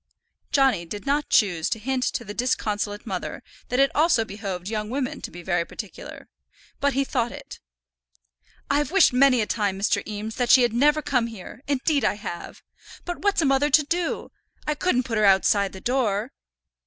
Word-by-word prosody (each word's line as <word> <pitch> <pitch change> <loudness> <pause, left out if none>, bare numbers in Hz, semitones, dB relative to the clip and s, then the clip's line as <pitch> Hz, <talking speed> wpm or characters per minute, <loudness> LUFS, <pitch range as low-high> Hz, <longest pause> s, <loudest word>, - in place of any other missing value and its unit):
Johnny 270 -10 +3
did 205 +7 -7
not 285 +2 0
choose 175 -7 +2
to - - -1
hint 255 +4 -2
to 235 - -2
the 205 - -6
disconsolate 210 -4 -2
mother 195 +4 -5 0.3
that 250 - 0
it 275 0 +4
also 305 -7 +3
behoved 195 -3 -6
young 215 0 -3
women 260 +1 -3
to - - -6
be 175 +1 -11
very 175 -1 0
particular, 205 +3 -9 0.5
but 280 0 +1
he 275 +2 +1
thought 240 -3 -1
it. - - -10 1.1
"I've 290 +1 +1
wished 380 -6 +5
many 255 -1 +5
a - - 0
time, 205 -3 -1
Mr. 200 +2 +1
Eames, 215 +1 -5
that 245 -2 0
she 255 - +7
had 240 -2 +1
never 295 +5 +3
come 250 -4 +1
here; 225 +1 -10
indeed 285 +1 +1
I - - +2
have. 175 -4 -8 0.4
But 350 0 -4
what's 405 -4 +1
a - - +2
mother 275 +2 +3
to 300 +2 +5
do? 340 +3 -2 0.3
I 300 - 0
couldn't 295 -4 +1
put 225 -3 -2
her 210 - +4
outside 195 0 +4
the 190 - -9
door." 235 -1 0
240 Hz, 190 wpm, -24 LUFS, 205-275 Hz, 1.1 s, she